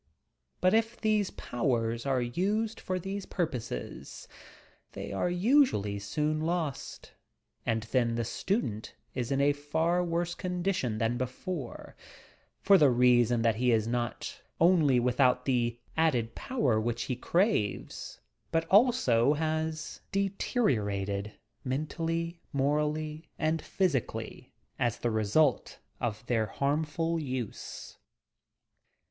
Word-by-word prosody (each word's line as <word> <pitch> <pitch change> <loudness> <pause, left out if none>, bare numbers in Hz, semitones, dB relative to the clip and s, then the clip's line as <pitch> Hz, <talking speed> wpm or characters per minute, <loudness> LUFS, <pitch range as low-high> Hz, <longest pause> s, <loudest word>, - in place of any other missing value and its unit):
But 185 +2 +4
if 225 +1 +1
these 215 -3 +2
powers 115 -1 -1
are 130 -2 +2
used 205 - -1
for 185 - -2
these 195 +2 -5
purposes, 125 - -4 0.7
they - - -6
are 100 - 0
usually 180 - +3
soon 150 +9 -1
lost, 160 -4 -3 0.6
and 110 -1 +1
then 115 0 +1
the 115 0 -1
student 115 - -2 0.2
is 125 0 -3
in 135 - +1
a 145 +1 +4
far 160 +5 0
worse 175 0 -1
condition 180 - -1
than 115 +2 0
before, 130 +3 -5 0.7
for 195 -1 +7
the 145 - +6
reason 120 -1 +4
that 115 -2 +2
he 125 +1 +3
is 110 -2 +3
not 120 0 -3 0.2
only 160 -7 +5
without 125 +1 +2
the 120 -3 +1 0.2
added 125 -9 +1
power 130 - 0
which 120 +1 -1
he 125 - -2
craves, 170 - -1 0.3
but 165 0 +1
also 190 - +5
has 160 +1 -2
deteri 195 - +1
orated 100 0 -3 0.3
mentally, 165 +5 -2
morally 150 +2 -1
and 155 0 0
physically 170 - -2 0.3
as 120 -2 +1
the 120 - -1
result 110 +6 +2 0.2
of 115 -1 -3
their 115 -3 +1
harmful 155 +6 -1
use. 130 -7 -6
145 Hz, 120 wpm, -30 LUFS, 120-170 Hz, 0.7 s, for